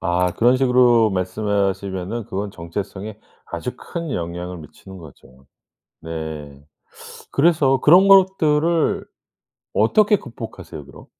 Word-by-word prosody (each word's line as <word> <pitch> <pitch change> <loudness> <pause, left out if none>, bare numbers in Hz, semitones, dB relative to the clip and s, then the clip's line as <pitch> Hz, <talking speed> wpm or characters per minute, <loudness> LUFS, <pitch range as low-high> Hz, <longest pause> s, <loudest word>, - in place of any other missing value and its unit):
아 90 +1 0
그런 120 +6 +3
식으로 125 -4 +4
말씀을 100 +2 -1
하시면은 95 +3 -5
그건 100 +1 -5
정체성에 100 +4 -7 0.3
아주 - - -5
큰 165 -3 -6
영향을 90 +1 -5
미치는 95 +5 -13
거죠. 65 -4 -16 0.6
네. 80 -3 -7 0.7
그래서 140 -4 +3
그런 180 +6 +6
것들을 170 -4 +3 0.7
어떻게 205 - +3
극복하세요, 115 - -10
그럼? 70 - -15
100 Hz, 265 characters per minute, -20 LUFS, 90-135 Hz, 0.7 s, 그런